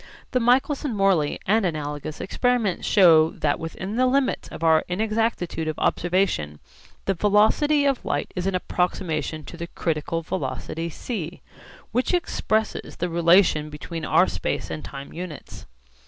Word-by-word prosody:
The 255 Hz, -, +2 dB
Michelson 255 Hz, +2 st, +2 dB
Morley 195 Hz, -7 st, +2 dB
and 215 Hz, +3 st, +3 dB
analogous 150 Hz, -3 st, -3 dB
experiments 235 Hz, -2 st, 0 dB
show 165 Hz, -6 st, +6 dB
that 145 Hz, -3 st, -1 dB
within 185 Hz, +6 st, -5 dB
the 255 Hz, 0 st, +4 dB
limits 270 Hz, +1 st, +1 dB
of 165 Hz, -, -8 dB
our 160 Hz, -1 st, +4 dB
inexactitude 215 Hz, -4 st, -1 dB
of 155 Hz, -, -3 dB
observation 175 Hz, -, 0 dB, 0.5 s
the 195 Hz, -, +2 dB
velocity 215 Hz, -, +3 dB
of 275 Hz, -3 st, +1 dB
light 145 Hz, -, -2 dB
is 180 Hz, +1 st, -2 dB
an 195 Hz, -, 0 dB
approximation 175 Hz, -4 st, -2 dB
to 170 Hz, -, -9 dB
the 170 Hz, 0 st, -5 dB
critical 165 Hz, 0 st, -2 dB
velocity 155 Hz, +4 st, -4 dB
'c' 175 Hz, -2 st, -5 dB, 0.5 s
which 250 Hz, +9 st, +1 dB
expresses 220 Hz, -10 st, -1 dB
the 180 Hz, -, -2 dB
relation 170 Hz, -2 st, +4 dB
between 160 Hz, +2 st, -7 dB
our -, -, +4 dB
space -, -, -3 dB
and 80 Hz, -1 st, -5 dB
time 135 Hz, -, -8 dB
units. 175 Hz, -3 st, -8 dB
180 Hz, 140 wpm, -24 LUFS, 155-220 Hz, 0.5 s, show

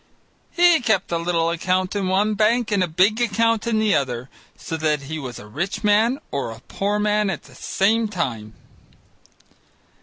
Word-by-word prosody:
He 345 Hz, -3 st, +4 dB
kept 220 Hz, -7 st, 0 dB
a 170 Hz, -, 0 dB
little 170 Hz, -1 st, 0 dB
account 185 Hz, +3 st, -1 dB
in 200 Hz, -2 st, -1 dB
one 200 Hz, +3 st, +2 dB
bank 220 Hz, +2 st, +1 dB
and 200 Hz, -2 st, +2 dB
a -, -, 0 dB
big 190 Hz, +8 st, +2 dB
account 230 Hz, 0 st, +1 dB
in 230 Hz, -2 st, +1 dB
the 215 Hz, -1 st, +2 dB
other, 125 Hz, -2 st, -2 dB, 0.3 s
so 165 Hz, -, -5 dB
that 155 Hz, -2 st, 0 dB
he 155 Hz, +3 st, -5 dB
was 130 Hz, -4 st, -7 dB
a -, -, -10 dB
rich 170 Hz, -, -4 dB
man 215 Hz, +5 st, +3 dB
or 140 Hz, -4 st, -2 dB
a 115 Hz, 0 st, -9 dB
poor 200 Hz, +8 st, -2 dB
man 210 Hz, 0 st, +1 dB
at 175 Hz, -, -4 dB
the 135 Hz, -, -17 dB
same 215 Hz, -, +1 dB
time. 120 Hz, -, -4 dB
190 Hz, 180 wpm, -22 LUFS, 155-215 Hz, 0.3 s, He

